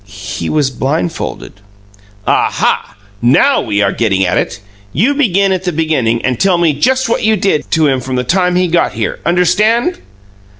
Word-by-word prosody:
"He 95 -3 -7
he - - -2
was 145 -3 +1
blindfolded." 140 - -3 0.7
"Aha! - - 0 0.3
NOW 130 - +3
we're 100 -2 0
getting 100 -5 0
at 90 0 0
it. 100 - -2 0.3
You 230 - +2
begin 200 -9 +1
at 185 -1 -1
the 180 - -1
beginning 150 -8 0
and 130 -3 -1
tell 190 -2 +2
me 170 -3 +2
just 260 - +1
what 230 - 0
you 220 0 +2
did 185 -6 -1
to 160 -1 +2
him 135 -3 +1
from 130 +1 -4
the 125 - 0
time 180 +6 +1
he 180 0 +2
got 170 0 +1
here. 110 0 -3
Understand?" 215 - +2
160 Hz, 175 wpm, -13 LUFS, 120-190 Hz, 0.7 s, NOW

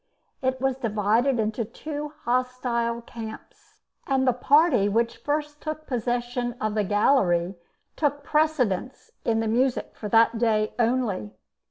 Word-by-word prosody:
It 260 0 0
was 265 0 0
divided 230 +3 +1
into 220 +2 0
two 295 +6 -6
hostile 240 -1 -1
camps, 220 -2 -10 0.3
and 265 -1 +1
the 255 - +5
party 260 - +4
which 230 +3 0
first 295 0 -3
took 310 0 -5
possession 245 -1 -2
of 215 -1 -1
the 210 -1 +1
gallery 190 -4 +2 0.4
took 290 -2 0
precedence 275 - 0
in 225 -1 +1
the 225 - -1
music 245 +3 +1
for 210 - -6
that 230 +1 +4
day 215 -2 +1
only. 230 - 0
240 Hz, 135 wpm, -25 LUFS, 220-270 Hz, 0.4 s, the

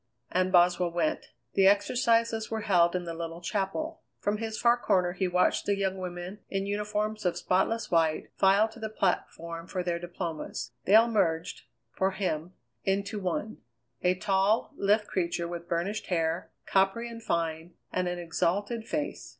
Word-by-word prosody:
And 185 +1 +1
Boswell 180 0 +4
went. 170 -2 -1 0.3
The 195 -1 +5
exercises 230 +2 +2
were 220 -1 -2
held 175 -5 +3
in 180 - -1
the 170 -1 -5
little 165 0 -5
chapel. 205 - -2 0.2
From 205 +1 -1
his 220 -1 -3
far 235 0 +5
corner 180 -7 +2
he 190 +1 -1
watched 180 0 +2
the 200 -1 +2
young 190 -1 -1
women, 180 +2 -6
in 195 0 -1
uniforms 210 +1 -2
of 180 -2 0
spotless 225 +5 0
white, 160 -2 +2
file 195 +3 +5
to 225 - -13
the 220 -1 -4
platform 170 -4 -2
for 185 -1 -3
their 175 -1 -1
diplomas. 170 - -5
They 200 - +5
all 225 +2 +7
merged, 165 - 0 0.3
for 190 +8 +1
him, 180 -3 -3 0.3
into 200 +2 -1
one 195 +3 -3 0.4
a 180 0 +3
tall, 195 +3 +1
lithe 210 +2 +2
creature 170 -2 -1
with 170 0 -7
burnished 185 +6 -1
hair, 165 -1 0 0.2
coppery 195 +5 +2
and 230 -1 -8
fine, 165 -3 -2 0.2
and 185 0 0
an 175 0 -2
exalted 190 +7 -1
face. 300 0 -3
190 Hz, 165 wpm, -29 LUFS, 175-210 Hz, 0.4 s, all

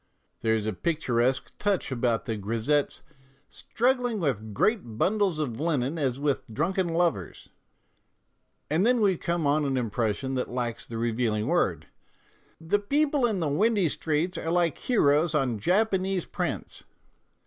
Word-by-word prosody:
There 110 0 +1
is 110 -2 -2
a 110 - -1
picturesque 130 - 0
touch 200 -8 0
about 120 -2 0
the 115 - -2
grisettes 115 +8 -1 0.2
" 135 +1 -35
strug 250 +3 0
gling 245 -3 -2
with 120 - -2
great 120 - 0
bundles 195 - +1
of 135 -7 -3
linen 150 -1 0
as 135 -3 -1
with 140 -5 -1
drunken 175 - 0
lovers," 165 - -1 1.2
and 160 +5 +1
then 245 +2 +3
we 200 -4 +3
come 170 -1 -2
on 145 +2 +2
an 135 -2 0
impression 115 +2 -1
that 130 -1 -2
lacks 120 -2 -3
the 115 - -6
revealing 115 -2 0
word: 95 - +1 0.4
" - - -35
The 205 - +4
people 280 +4 +2
in 205 -6 -1
the 160 - 0
windy 195 +4 +2
streets 160 +4 -1
are 165 - -3
like 170 -3 +1
heroes 155 - +2
on 130 -7 0
Japanese 190 - +1
prints." - - -4
150 Hz, 155 wpm, -27 LUFS, 120-185 Hz, 1.2 s, The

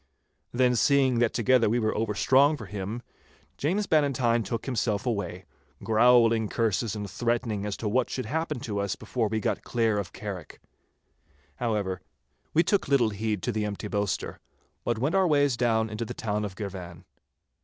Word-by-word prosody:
Then 125 0 +3
seeing 130 -1 +3
that 120 -2 +3
together 125 -4 +3
we 115 - +2
were 110 -2 0
overstrong 130 +7 +3
for - - -8
him, 105 +4 -5 0.5
James 190 +8 0
Bannatyne 135 -8 +2
took 115 +1 -4
himself 120 -4 -1
away, 100 -6 -3 0.4
growling 115 -1 +4
curses 110 -1 0
and 105 -1 -4
threatenings 115 -1 -1
as 100 - -3
to 110 - -3
what 120 +4 +1
should 130 - -3
happen 160 -4 -2
to 105 -6 -3
us 100 -1 -1
before 115 -4 -2
we 110 +1 -1
got - - -1
clear 115 -3 +1
of 90 -4 -5
Carrick. 95 -6 -7 1.0
However, 105 -6 -1 0.5
we 165 - +4
took 200 +4 +1
little 130 -5 +3
heed 105 -1 -2
to - - 0
the 110 -1 -1
empty 105 0 -4
boaster, 100 -3 -2 0.4
but 120 - 0
went 135 +7 0
our 190 -1 +4
ways 145 -4 +3
down 115 -2 +1
into 110 +2 -4
the 115 - -6
town 105 -1 -2
of 95 -2 -6
Girvan. 90 -5 -7
115 Hz, 170 wpm, -27 LUFS, 105-125 Hz, 1.0 s, growling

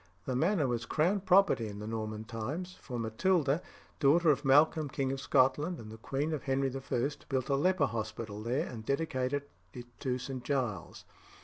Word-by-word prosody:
The 130 - -2
manor 165 +3 +2
was 120 -2 -2
crown 175 +7 +2
property 185 - +4
in 100 -1 -7
the 105 - -6
Norman 110 -1 -4
times, 135 +12 -5
for 125 -3 -6
Matilda, 145 +7 +1 0.4
daughter 155 +3 +5
of 140 - 0
Malcolm 150 +2 +4
king 135 0 -1
of 135 0 -3
Scotland 145 +8 +2
and 110 -5 -9
the 110 - -9
queen 140 +7 -2
of 150 - -2
Henry 135 -1 0
I., 135 0 -1 0.2
built 130 0 -1
a 140 - +3
leper 170 +2 +3
hospital 110 -2 -4
there, 120 +5 0
and 115 -3 -7
dedicated 140 0 -1 0.3
it 120 -1 -11
to 130 -3 -1
St. 130 0 -6
Giles. 120 - -2
135 Hz, 180 wpm, -31 LUFS, 115-150 Hz, 0.4 s, daughter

